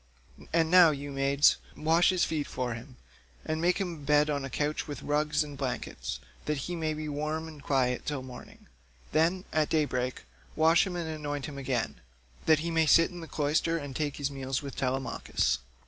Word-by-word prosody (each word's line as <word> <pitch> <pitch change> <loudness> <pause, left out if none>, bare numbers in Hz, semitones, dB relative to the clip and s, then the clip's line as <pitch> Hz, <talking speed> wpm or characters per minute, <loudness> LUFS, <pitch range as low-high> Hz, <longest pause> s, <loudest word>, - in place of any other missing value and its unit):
And 165 0 +2
now, 180 -2 +9
you 145 -1 -4
maids, 140 +1 +4 0.2
wash 165 +3 +4
his 185 -2 +2
feet 155 -3 -1
for 125 -2 -2
him, 125 +3 -10 0.5
and 155 0 -2
make 180 +1 +3
him 190 -3 -2
a - - -9
bed 150 +1 +3
on 140 -1 -1
a 135 - -4
couch 150 +3 -1
with 145 -4 -6
rugs 150 +1 +1
and 145 -1 -8
blankets, - - -4 0.3
that 150 0 0
he 175 - -3
may 160 -2 -1
be 155 0 -5
warm 155 +2 -2
and 155 -3 -11
quiet 130 -3 +1
till 145 -3 -3
morning. 130 -1 -11 0.5
Then, 170 +4 +2
at 155 -1 +2
day 155 -2 +3
break 125 -2 -3 0.3
wash 165 +3 +5
him 180 - -4
and 170 -2 -3
anoint 145 -3 -4
him 140 -2 -7
again, 130 -4 -2 0.5
that 155 -1 +5
he 170 - -1
may 165 -1 +3
sit 165 +5 +6
in 175 - -8
the 165 - -8
cloister 155 +3 +1
and 145 -4 -6
take 145 -1 -2
his 145 -1 -2
meals 135 0 -3
with 140 - -7
Telemachus. 130 - 0
150 Hz, 200 wpm, -29 LUFS, 140-160 Hz, 0.5 s, now